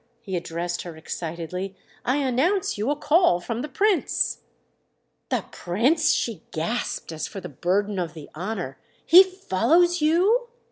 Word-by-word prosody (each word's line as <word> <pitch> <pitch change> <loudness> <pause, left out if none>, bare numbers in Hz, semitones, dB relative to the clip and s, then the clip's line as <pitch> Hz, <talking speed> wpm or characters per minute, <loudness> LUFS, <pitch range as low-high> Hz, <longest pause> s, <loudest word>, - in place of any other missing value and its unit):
—he 190 -4 -4
addressed 175 0 -3
her 170 -3 -8
excitedly. 170 +4 -5 0.3
"I 260 +3 +1
announce 290 +8 +1
you 210 +5 -1
a 290 - +2
call 295 - +3
from 230 +6 -4
the 300 - -5
Prince." 390 +7 +1 0.9
"The - - -1
Prince?"—she 230 - +1
gasped 165 +4 -3
as 160 -1 -4
for 195 - -7
the - - -8
burden 200 +2 0
of 170 -2 -3
the 155 -3 -9
honour. 180 -5 -4 0.3
"He 355 +4 +10
follows 350 - +2
you?" 380 +11 +3
220 Hz, 140 wpm, -24 LUFS, -, 0.9 s, He